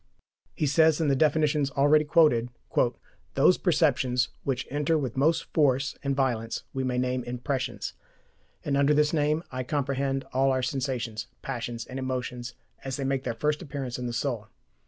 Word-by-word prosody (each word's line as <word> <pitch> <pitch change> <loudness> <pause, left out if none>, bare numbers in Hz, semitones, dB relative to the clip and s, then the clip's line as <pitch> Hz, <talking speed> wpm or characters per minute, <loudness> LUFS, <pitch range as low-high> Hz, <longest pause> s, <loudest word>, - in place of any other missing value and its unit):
He 155 - 0
says, 160 +2 +4
in 160 -3 +2
the 135 - +3
definitions 150 -1 +2
already 145 +2 +4
quoted: 145 -7 +4 0.9
"Those - - +5
perceptions, 125 -1 +2
which 135 -2 -1
enter 150 +3 +1
with 130 -6 -3
most 155 +5 +2
force 135 -3 +2
and 140 -1 0
violence, 120 -4 -1
we 135 - -2
may 125 -1 -1
name 125 0 0
IMPRESSIONS; 125 +2 -3 0.7
and 140 - 0
under 140 +1 +4
this 150 +1 +3
name 155 +1 +1
I 130 0 -3
comprehend 135 0 -1
all 135 +1 +3
our 130 -1 0
sensations, 125 -4 -2 0.2
passions 120 -3 -4
and 130 - -6
emotions, 125 -1 -4 0.3
as 135 -1 -4
they 140 - -3
make 135 0 -1
their 120 -2 -2
first 150 +6 0
appearance 135 -6 -5
in 125 - -3
the - - -3
soul. 120 -3 -2
135 Hz, 165 wpm, -27 LUFS, 125-145 Hz, 0.9 s, Those